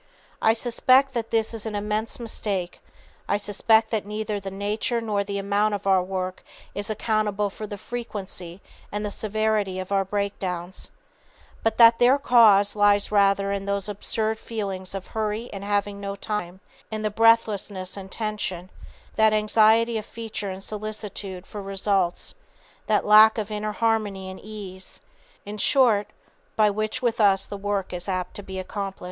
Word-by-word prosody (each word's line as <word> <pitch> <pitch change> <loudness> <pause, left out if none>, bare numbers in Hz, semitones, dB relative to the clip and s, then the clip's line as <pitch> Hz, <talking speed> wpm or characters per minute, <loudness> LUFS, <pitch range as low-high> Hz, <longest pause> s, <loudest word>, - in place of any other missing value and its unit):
I 220 - +5
suspect 255 +3 +3
that 230 -2 -3
this 225 0 +1
is 225 -1 -4
an 215 - -4
immense 210 +3 -2
mistake, 200 -6 -4 0.5
I - - +2
suspect 220 +2 +2
that 220 -3 0
neither 210 0 -3
the 195 -1 -6
nature 205 +4 -1
nor 210 -3 -1
the 200 0 -4
amount 205 +1 +1
of 200 - -7
our 190 -1 +4
work 185 0 -4 0.3
is 205 +2 -4
accountable 210 -2 0
for 215 +2 -7
the 205 - -6
frequency 195 -6 -6 0.3
and 210 +1 -3
the 205 - -3
severity 215 -2 -1
of 185 +1 -6
our 195 -1 +3
breakdowns, 190 -2 -3 0.7
but 225 -1 0
that 230 -1 +7
their 250 +3 +5
cause 220 -7 +5
lies 205 0 +3
rather 200 -1 +3
in 200 0 -2
those 200 0 -1
absurd 220 +2 -1
feelings 195 -4 -4
of 195 - -5
hurry 220 +2 -3
and 195 0 -6
having 205 0 -1
no 200 0 -4
time, 190 -3 -5 0.3
in 215 -1 -4
the 215 - 0
breathlessness 210 -4 +2
and 195 -1 -8
tension, 205 -5 -4 0.5
that 220 0 +5
anxiety 220 +2 +4
of 210 - -9
feature 225 -3 -5
and 190 +1 -7
solicitude 210 -3 -6
for 205 - -7
results, 195 -2 -1 0.5
that 215 -2 +2
lack 215 +1 +7
of 215 -1 -3
inner 210 0 -3
harmony 210 -4 -1
and 190 - -10
ease, 195 -3 -9 0.5
in 210 +1 -7
short, 225 -5 +3 0.5
by 215 -1 +4
which 215 +3 -2
with 235 -2 +1
us 195 -2 +4
the - - -7
work 200 -1 -2
is 180 +2 -5
apt 185 -1 -2
to - - -6
be 190 -1 -8
accompanied." 195 +1 -5
205 Hz, 165 wpm, -25 LUFS, 195-220 Hz, 0.7 s, that